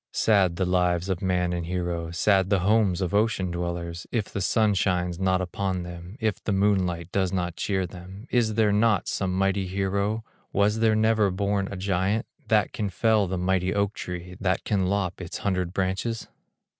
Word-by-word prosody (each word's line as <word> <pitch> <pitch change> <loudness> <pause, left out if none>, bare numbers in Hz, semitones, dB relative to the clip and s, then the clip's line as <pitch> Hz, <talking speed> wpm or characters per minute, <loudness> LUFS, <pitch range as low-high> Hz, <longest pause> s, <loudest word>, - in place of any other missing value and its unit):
Sad 100 -5 +3
the 95 - 0
lives 90 0 +1
of 95 -3 -1
man 90 -2 +1
and 85 -1 -3
hero, 85 -2 -2
Sad 95 +2 +2
the 100 -3 +2
homes 100 -2 +2
of 90 -1 -1
ocean 100 -4 +1
dwellers, 85 0 -4
If 110 -4 -1
the 100 - -2
sun 110 +2 +2
shines 90 -2 0
not 95 -1 +2
upon 95 -1 -2
them, 90 +4 -9
If 110 -4 -1
the - - -1
moonlight 95 -4 +1
does 95 -2 +1
not 90 -2 -2
cheer 95 0 -1
them! 95 +4 -10
Is 115 -3 +2
there 110 -2 +3
not 105 -1 +2
some 95 -2 -1
mighty 95 0 +1
hero, 100 +3 -1 0.3
Was 105 +2 +2
there 110 -1 +3
never 110 -1 +3
born 100 +1 0
a 100 - -5
giant, 95 +4 0 0.2
That 105 -3 +2
can 105 -2 -2
fell 105 +1 +2
the 95 +1 -2
mighty 90 +1 0
oak 100 0 +1
tree, 90 -1 -6
That 95 -1 0
can 95 -4 0
lop 95 -2 -1
its 85 - -5
hundred 90 -3 -1
branches? 95 +5 -2
95 Hz, 185 wpm, -26 LUFS, 90-105 Hz, 0.3 s, Sad